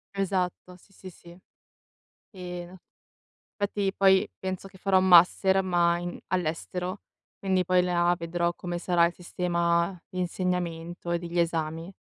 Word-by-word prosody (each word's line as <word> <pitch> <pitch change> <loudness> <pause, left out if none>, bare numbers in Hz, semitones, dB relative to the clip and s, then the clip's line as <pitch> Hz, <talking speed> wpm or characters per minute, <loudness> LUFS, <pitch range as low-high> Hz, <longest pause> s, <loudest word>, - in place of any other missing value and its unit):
Esatto, 185 -2 -2
sì, 195 +2 -25
sì, 185 0 -11
sì. 175 0 -15 0.9
Ehm, 180 -1 -8 0.8
fatti 200 -1 -1
poi 190 -1 +4
penso 190 0 -4
che 190 0 -17
farò 190 0 +3
master 190 +1 +5
ma 175 -2 +2
in 175 0 -5
all'estero. 180 +2 -3 0.4
Quindi 190 -2 +1
poi 180 0 +3
là 175 -1 +2
vedrò 170 0 -1
come 175 -1 -4
sarà 175 -1 +3
il 170 - -1
sistema 170 0 -1
d'insegnamento 175 -1 -3
e 170 - +1
degli 170 0 -3
esami. 165 +1 -2
180 Hz, 130 wpm, -27 LUFS, 170-185 Hz, 0.9 s, master